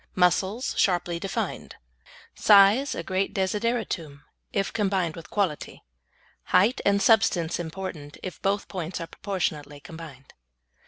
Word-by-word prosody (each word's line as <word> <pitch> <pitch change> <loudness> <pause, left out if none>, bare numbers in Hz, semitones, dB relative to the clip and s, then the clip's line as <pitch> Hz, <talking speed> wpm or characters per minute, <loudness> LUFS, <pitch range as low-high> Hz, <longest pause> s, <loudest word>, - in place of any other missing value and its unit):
Muscles 190 +6 +1
sharply 175 -2 +1
defined. 195 +1 -4 0.6
Size 210 +7 +5
a - - -4
great 190 +1 -1
desideratum, 190 -7 -2 0.3
if 195 -1 -1
combined 190 -6 0
with 165 - -10
quality. 190 -8 -2 0.6
Height 210 +8 +3
and 200 0 +3
substance 195 -6 +3
important 160 -3 -6
if 185 - -7
both 200 +1 0
points 180 -2 -5
are 165 - -4
proportionately 155 -7 -4
combined. 150 -4 -11
185 Hz, 115 wpm, -26 LUFS, 165-200 Hz, 0.6 s, Size